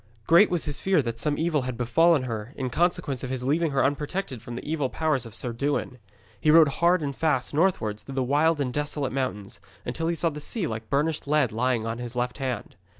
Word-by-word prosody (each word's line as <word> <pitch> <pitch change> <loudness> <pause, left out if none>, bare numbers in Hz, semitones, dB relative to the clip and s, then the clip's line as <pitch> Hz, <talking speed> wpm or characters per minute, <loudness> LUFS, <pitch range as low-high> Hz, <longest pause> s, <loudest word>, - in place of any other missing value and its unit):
Great 175 +6 +6
was 175 -2 0
his 145 -2 -2
fear 190 -3 +3
that 115 -1 -4
some 145 +4 0
evil 160 -3 +1
had 125 -2 -4
befallen 145 +5 +3
her 115 0 -5
in 130 -2 -3
consequence 170 -3 0
of 130 - -4
his 130 -1 -3
leaving 155 +5 +1
her 140 -2 +2
unprotected 145 - -2
from 120 - -8
the 125 - -7
evil 150 -4 -1
powers 150 -7 0
of 110 - -10
Sir 120 +1 -3
Dewin. 135 0 -2 0.4
He 155 - +1
rode 155 -1 +7
hard 170 +3 +2
and 140 -2 -3
fast 150 -5 0
northwards 145 - +1
through 135 - -9
the 135 - +1
wild 150 +4 +2
and 130 -3 -1
desolate 145 -2 -2
mountains, 130 -7 -3 0.3
until 160 +7 -2
he 170 - 0
saw 165 +1 0
the 150 0 -7
sea 190 +5 -2
like 110 -5 -5
burnished 150 +2 0
lead 145 -5 +2
lying 120 0 0
on 115 +1 -3
his 120 0 -6
left 125 +3 -2
hand. 130 -2 -4
140 Hz, 225 wpm, -26 LUFS, 125-160 Hz, 0.4 s, rode